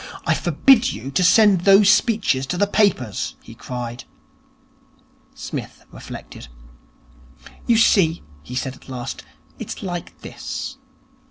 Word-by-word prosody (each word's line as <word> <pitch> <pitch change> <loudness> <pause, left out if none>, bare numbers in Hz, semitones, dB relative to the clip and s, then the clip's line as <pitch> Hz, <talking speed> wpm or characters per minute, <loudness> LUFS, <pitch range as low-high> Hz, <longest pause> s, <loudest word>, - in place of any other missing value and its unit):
'I - - +3
forbid 255 -3 +3
you 125 +6 -7
to 180 - +1
send 200 0 +5
those 195 +2 +6
speeches 210 - +1
to 180 - -3
the 205 - +3
papers,' 200 - 0
he - - -14
cried. 120 -1 -7 1.3
Psmith 150 - -7
reflected. - - -10 1.2
'You 235 - +4
see,' 185 -7 +3 0.2
he 125 +12 -9
said 130 0 -3
at 130 - -18
last, 125 -2 -6 0.4
'it - - -6
is - - -10
like 175 -3 -6
this. - - -7
175 Hz, 125 wpm, -21 LUFS, 130-205 Hz, 1.3 s, those